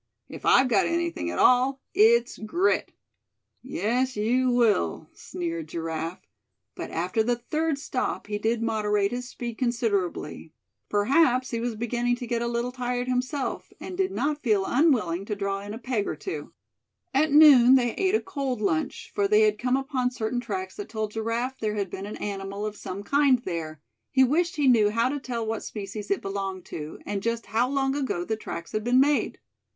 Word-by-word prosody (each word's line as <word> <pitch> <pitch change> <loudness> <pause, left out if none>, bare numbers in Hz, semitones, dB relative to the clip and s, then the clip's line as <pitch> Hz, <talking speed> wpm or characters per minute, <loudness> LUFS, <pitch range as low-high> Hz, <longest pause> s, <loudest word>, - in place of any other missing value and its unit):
If - - -7
I've 260 - +6
got 235 -5 +3
anything 335 - -1
at 90 - -4
all, 255 +2 +4
it's 235 +2 +4
grit." 345 - 0 0.7
"Yes, 250 +1 -1
you 250 +5 +2
will," 225 - +2
sneered 165 -2 -5
Giraffe; 165 +1 -4 0.5
but - - -6
after 180 +6 0
the 240 +2 +1
third 305 +5 -1
stop 270 -3 -3
he 210 0 -3
did 225 +2 0
moderate 210 -3 +1
his 245 0 -4
speed 235 -3 -6
considerably; 205 - -1 0.4
perhaps 255 +4 +3
he 230 - -1
was 235 -1 -2
beginning 240 +2 0
to 245 0 -6
get 235 0 -1
a 235 - -1
little 235 +1 -1
tired 250 0 -2
himself, 255 +3 -2
and 365 - -7
did 380 0 +1
not 295 -3 -1
feel 210 -6 +2
unwilling 230 - +2
to 210 - -3
draw 200 -1 -2
in 205 +1 -8
a 220 - -5
peg 235 -4 -2
or - - -2
two. 385 - -6 0.6
At 295 +3 +3
noon 275 -4 +8
they 240 -3 +2
ate 385 +1 +1
a - - +2
cold 275 - -3
lunch, 165 -7 -2
for 200 - +1
they 210 +1 +4
had 215 -1 +3
come 250 +1 +1
upon 270 -2 -1
certain 245 0 -2
tracks 190 -6 -5
that 205 - -6
told 220 -2 -3
Giraffe 230 +4 -2
there 215 -1 -1
had 200 -3 -2
been 195 +1 -5
an 210 - -6
animal 200 0 -4
of 215 -1 -4
some 200 0 -6
kind 280 +2 +4
there 160 -4 -4 0.3
he 265 - +4
wished 340 +8 +1
he 290 -3 +1
knew 220 -5 +5
how 230 +4 +1
to 290 +1 -2
tell 240 -4 -4
what 220 0 -2
species 205 0 -6
it 200 - 0
belonged 195 -2 -4
to, 150 0 -6
and 200 -1 -3
just 230 +2 -2
how 235 +3 +1
long 270 -1 +1
ago 260 -11 -2
the 220 - -1
tracks 170 -5 -7
had 215 - -2
been 245 +2 +3
made. 290 +1 +2
235 Hz, 190 wpm, -26 LUFS, 205-255 Hz, 0.7 s, noon